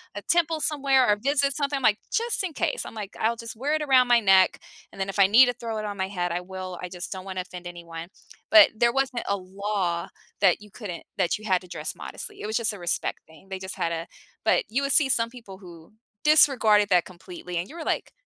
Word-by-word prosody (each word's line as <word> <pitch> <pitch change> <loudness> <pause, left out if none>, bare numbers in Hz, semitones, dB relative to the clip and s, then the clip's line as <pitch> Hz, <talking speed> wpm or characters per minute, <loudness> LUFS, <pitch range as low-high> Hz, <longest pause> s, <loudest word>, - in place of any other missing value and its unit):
a - - -5
temple 330 -2 +1
somewhere 275 -4 +2
or 210 - +4
visit 280 +1 +1
something," 285 -1 -1
I'm 270 - -6
like, 210 -2 +3
"Just 470 +1 0
in 360 -4 -4
case," - - -2
I'm - - -9
like, 210 -2 -7
"I'll 225 +2 +1
just 230 0 -8
wear 275 +7 -1
it 310 - -1
around 260 -3 +4
my 240 -1 +5
neck, 190 -2 +4 0.3
and - - -14
then 195 0 -2
if 195 - -5
I 195 - +7
need 230 +6 +7
to 245 - 0
throw 230 -2 -5
it 215 - -4
on 205 -1 -5
my 190 0 -1
head, 175 -3 -3
I 175 - -1
will, 185 -1 -7
I 180 - -4
just 180 0 -7
don't 190 -1 -6
wanna 190 -1 -4
offend 180 -1 -9
anyone." 170 -1 -8 0.4
But 215 -2 +8
there 235 +2 +2
wasn't 265 -2 -1
a 200 - +1
law 190 -2 -3 0.3
that 195 -1 +4
you 210 -1 -15
couldn't 195 -6 -7
that 180 -3 +1
you 215 - -13
had 185 -3 +2
to 180 - -14
dress 175 - -5
modestly. 415 -1 -8
It - - -4
was 220 - 0
just 230 -1 0
a 205 - -9
respect 175 -1 -2
thing. 160 +4 -19
They 190 -1 -5
just 190 0 -6
had 170 - -1
a 165 0 -4 0.4
but - - +3
you 255 +5 0
would 275 - +2
see 290 -4 +4
some 230 -2 +2
people 230 -6 -12
who 175 0 -14 0.3
disregarded 230 -9 +5
that 180 -3 +4
completely, 180 -1 -8
and 175 +3 -3
you 315 - -12
were 335 - -6
like, - - -2
210 Hz, 255 wpm, -25 LUFS, 185-255 Hz, 0.4 s, But